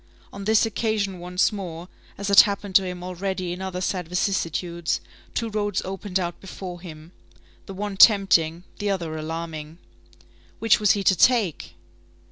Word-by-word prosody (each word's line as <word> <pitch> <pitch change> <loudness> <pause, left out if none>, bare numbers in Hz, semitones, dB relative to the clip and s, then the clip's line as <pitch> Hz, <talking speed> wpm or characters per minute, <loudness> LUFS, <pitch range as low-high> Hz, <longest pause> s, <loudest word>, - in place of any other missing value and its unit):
On 200 0 -7
this 220 +2 +4
occasion 215 -4 -1
once 180 +1 +1
more, 180 -4 -6 0.3
as 200 0 -3
had 200 - +8
happened 200 -2 -3
to 195 0 +6
him 180 -1 -6
already 185 0 -3
in 180 - -7
other 185 -1 -4
sad 185 -2 -2
vicissitudes, 170 -2 -1 0.4
two 230 - -1
roads 205 -2 -1
opened 190 0 -3
out 175 -1 -4
before 185 -2 -8
him, 160 -2 -11 0.6
the 195 - -7
one 200 0 -4
tempting, 180 -6 +5 0.2
the 205 -1 -1
other 170 -5 -2
alarming. 160 0 -6 0.8
Which 225 -1 +3
was 210 -1 +4
he 200 - -2
to 190 - +4
take? 215 - +2
190 Hz, 155 wpm, -24 LUFS, 175-200 Hz, 0.8 s, had